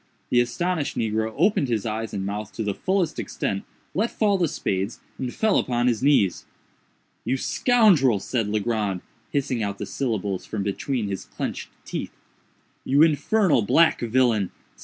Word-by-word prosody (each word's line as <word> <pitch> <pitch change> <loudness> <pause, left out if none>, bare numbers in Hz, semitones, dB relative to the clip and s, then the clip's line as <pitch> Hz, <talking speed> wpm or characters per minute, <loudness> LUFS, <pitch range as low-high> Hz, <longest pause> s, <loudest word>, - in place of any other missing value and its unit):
The 120 - +5
astonished 160 +6 -1
negro 110 0 0
opened 175 -3 +3
his 115 -4 -1
eyes 110 0 -3
and 95 -2 -3
mouth 105 +1 -4
to 110 - -3
the 105 -1 -1
fullest 185 - 0
extent, 100 0 -3 0.3
let 220 +5 +1
fall 210 -2 +1
the 180 -3 +2
spades, 95 -5 -2 0.2
and 130 -2 -3
fell 220 - +2
upon 120 -1 0
his 120 -2 +1
knees. 130 -10 +2 0.8
"You 130 - 0
scoundrel," 180 - +4
said 115 +2 -1
Legrand, 105 -3 -1 0.3
hissing 130 -4 -1
out 100 -1 -2
the 105 - -4
syllables 100 -4 -2
from 105 -3 -4
between 110 +3 -2
his 95 -1 -4
clenched - - -5 0.2
teeth—"you 140 +3 -3
infernal 165 - +3
black 160 +11 +4
villain! 115 -4 +2
120 Hz, 150 wpm, -24 LUFS, 105-150 Hz, 0.8 s, The